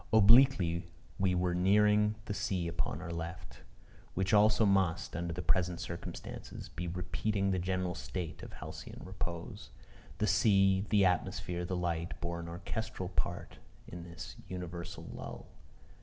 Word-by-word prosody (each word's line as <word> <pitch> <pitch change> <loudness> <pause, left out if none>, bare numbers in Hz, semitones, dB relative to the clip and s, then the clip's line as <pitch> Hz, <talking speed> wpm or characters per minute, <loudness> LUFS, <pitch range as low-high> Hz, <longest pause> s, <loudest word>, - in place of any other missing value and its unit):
Obliquely 105 -6 +6 0.3
we 95 -2 +3
were 90 0 +1
nearing 105 +3 +4
the 105 - -2
sea 100 -4 -1
upon 85 0 -2
our 85 - -5
left, 85 +2 -6 0.6
which 95 +1 +1
also 105 +1 +6
must, 95 -6 +2
under 85 +1 -2
the 85 +1 -4
present 90 +1 +1
circumstances, 85 - -7
be 85 +1 -5
repeating 95 +3 -1
the 95 - +1
general 90 0 -1
state 85 -2 -5
of - - -8
halcyon - - -8
repose. 85 -3 -5 0.5
The 105 - +1
sea, 100 -1 +4
the 100 -3 +5
atmosphere, 90 -1 0
the 90 +1 -2
light, 85 -1 -2
bore 85 0 -3
an 85 - -6
orchestral 95 +1 -4
part 85 -2 -3 0.3
in 85 - -7
this 85 0 -8
universal 85 -1 -6
lull. - - -7
90 Hz, 140 wpm, -33 LUFS, 85-100 Hz, 0.6 s, Obliquely